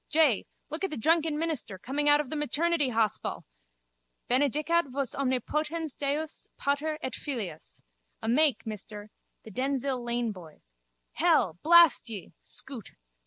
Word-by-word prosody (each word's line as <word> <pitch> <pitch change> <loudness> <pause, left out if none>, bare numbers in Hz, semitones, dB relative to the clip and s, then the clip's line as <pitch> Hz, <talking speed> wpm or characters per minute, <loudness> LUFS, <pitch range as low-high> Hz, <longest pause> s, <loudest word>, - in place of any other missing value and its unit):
Jay, 305 -9 +3 0.2
look 315 +5 -3
at 385 - +1
the 310 - -5
drunken 320 +4 +2
minister 305 - -2
coming 285 +8 0
out 290 0 +7
of 295 -3 -3
the - - -1
maternity 300 0 +1
hospal! 225 -3 -1 0.8
Benedicat 295 +6 +2
vos 270 -1 -2
omnipotens 300 +4 -1
Deus, 295 +2 -3
Pater 295 +2 0
et 260 - -3
Filius. 215 - -6 0.4
A - - -5
make, 270 0 +3
mister. 210 -1 -7 0.3
The 220 - -11
Denzille 265 +1 -1
lane 240 -1 -1
boys. 160 - -13 0.4
Hell, 160 - +2
blast 335 -6 +6
ye! 205 -6 -8
Scoot. 255 -7 -5
275 Hz, 135 wpm, -29 LUFS, 230-310 Hz, 0.8 s, out